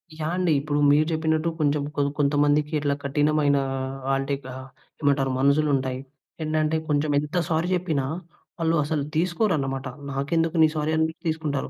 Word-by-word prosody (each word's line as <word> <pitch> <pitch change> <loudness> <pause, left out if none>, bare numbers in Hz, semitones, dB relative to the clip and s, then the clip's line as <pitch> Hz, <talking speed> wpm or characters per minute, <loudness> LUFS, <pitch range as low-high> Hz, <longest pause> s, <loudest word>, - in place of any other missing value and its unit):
Yeah! 155 +1 -3
అండి. 180 -2 +1
ఇప్పుడు 145 +1 -1
మీరు 150 +2 +4
జెప్పినట్టు 160 0 0
కొంచెం 145 -1 +1
కొ 145 - +1 0.2
కొంతమందికి 145 +1 +2
ఇట్లా 145 -1 0
కఠినమైన 145 0 +2 0.5
ఆహ్, - - +3
అంటే 135 +1 -2 0.2
ఆహ్, 130 +1 -8 0.3
ఏమంటారు 140 -2 +2
మనసులుంటాయి. 135 -2 +2 0.4
ఏంటంటే 155 0 +1
కొంచెం 150 0 +1
ఎంత 150 +4 -3
సారీ 165 +1 +1
చెప్పినా 165 -7 -1 0.5
వాళ్ళు 165 0 +2
అసలు 150 0 -1
తీసుకోరనమాట. 155 - 0 0.2
నాకెందుకు 165 +5 0
నీ - - +7
సారీ 155 0 0
అని 160 0 +3 0.2
తీసుకుంటారు. 155 -3 -2
150 Hz, 145 wpm, -25 LUFS, 140-160 Hz, 0.5 s, నీ